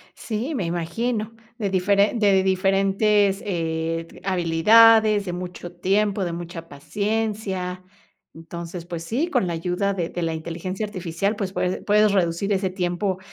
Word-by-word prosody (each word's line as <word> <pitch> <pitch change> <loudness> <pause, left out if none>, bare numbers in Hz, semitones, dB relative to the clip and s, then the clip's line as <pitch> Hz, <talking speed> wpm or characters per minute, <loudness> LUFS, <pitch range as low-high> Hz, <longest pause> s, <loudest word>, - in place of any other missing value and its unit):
Sí, 235 +7 -4
me 200 - -1
imagino, 215 +7 -2 0.3
de 210 -5 -1
diferen 200 +4 +2
de 195 -3 +4
diferentes, 195 +1 +2
eh, 165 -3 -2
t - - -15
habilidades, 210 +4 +5
de 180 - -4
mucho 180 -1 -7
tiempo, 195 +2 +1
de 170 - -3
mucha 170 -1 -7
paciencia. 200 +1 -3 0.5
Entonces, 170 +1 -8
pues 170 -2 -6
sí, 245 - -1
con 250 - +1
la 170 - -2
ayuda 180 +4 -1
de 175 -4 -3
de 175 - -5
la 165 -1 -1
inteligencia 170 +5 -4
artificial, 190 +1 -2
pues, 195 -2 -4
puese 180 -1 -1
puedes 210 0 +3
reducir 190 +1 +1
ese 190 -1 0
tiempo 185 +1 -2
190 Hz, 150 wpm, -23 LUFS, 175-210 Hz, 0.5 s, habilidades